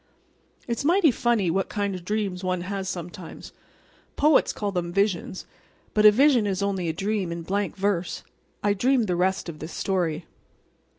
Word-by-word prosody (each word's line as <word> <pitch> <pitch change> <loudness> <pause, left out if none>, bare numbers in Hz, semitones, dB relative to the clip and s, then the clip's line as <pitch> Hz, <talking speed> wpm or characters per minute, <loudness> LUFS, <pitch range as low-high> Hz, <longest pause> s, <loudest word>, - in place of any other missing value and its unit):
It's 235 +2 -2
mighty 335 0 +4
funny 230 -7 +1
what 190 +2 -1
kind 200 -1 -1
of 180 -2 -6
dreams 195 -2 -2
one 185 -1 -1
has 190 +1 -4
sometimes. 175 -1 -8 0.6
Poets 300 0 +4
call 205 -1 -3
them 175 -2 -2
visions, 195 -1 -1 0.5
but 210 0 +6
a - - +9
vision 250 -2 +4
is 195 0 -1
only 190 -4 -1
a - - +2
dream 195 +1 -2
in 170 0 -5
blank 200 +3 -2
verse. 190 -3 -1 0.4
I 205 0 +3
dreamed 245 +4 +2
the 180 -3 0
rest 185 +2 0
of 160 -3 -7
this 160 +2 -7
story. 175 -5 -1
195 Hz, 170 wpm, -25 LUFS, 180-210 Hz, 0.6 s, a